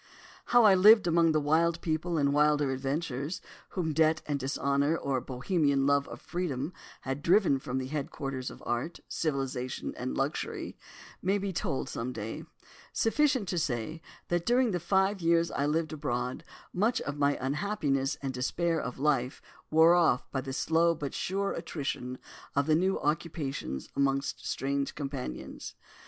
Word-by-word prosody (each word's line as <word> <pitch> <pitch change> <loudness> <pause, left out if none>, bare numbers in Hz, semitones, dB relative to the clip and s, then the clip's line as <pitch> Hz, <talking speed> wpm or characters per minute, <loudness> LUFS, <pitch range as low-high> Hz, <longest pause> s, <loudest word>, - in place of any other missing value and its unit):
"How 240 -1 +5
I 210 -3 +8
lived 210 +3 +7
among 170 -1 +4
the 155 - +3
wild 165 +3 +2
people 165 +1 -1
and 140 -1 +2
wilder 150 -1 +3
adventurers, 140 +3 -2 0.4
whom 160 -4 0
debt 155 0 +3
and 145 -2 -1
dishonour, 140 +3 +1
or 135 -4 -1
Bohemian 140 +1 +1
love 140 0 +3
of - - -8
freedom 165 -3 -3 0.3
had 135 +2 -3
driven 175 -5 +4
from 130 0 -4
the 130 - -2
headquarters 135 -2 -4
of - - -12
art, 120 +8 -2
civilisation 135 -4 -2
and 65 - -4
luxury, - - -2 0.5
may 195 +3 +2
be 200 -1 -3
told 135 - -2
some 125 +2 -4
day; 110 0 -5 0.5
sufficient 260 -2 +2
to 175 - 0
say 155 +1 -2 0.3
that 175 -1 +1
during 245 +3 +3
the 180 - -1
five 190 +3 +1
years 165 0 +3
I 140 - 0
lived 160 +1 0
abroad 125 -3 -3 0.3
much 215 +6 +2
of 145 0 -4
my 145 0 +3
unhappiness 140 -1 0
and 135 -1 -2
despair 165 +6 0
of 125 - -5
life 135 -3 +1 0.3
wore 160 +2 +6
off 170 -8 +2
by 135 - -1
the 135 - -6
slow 165 +4 +2
but 145 -3 -5
sure 195 +1 -1
attrition 130 -4 -4 0.4
of 140 +1 +2
new 180 +5 +3
occupations 145 - -2
amongst 140 0 0
strange 140 +1 -1
companions. 135 - -6
150 Hz, 155 wpm, -30 LUFS, 135-170 Hz, 0.5 s, I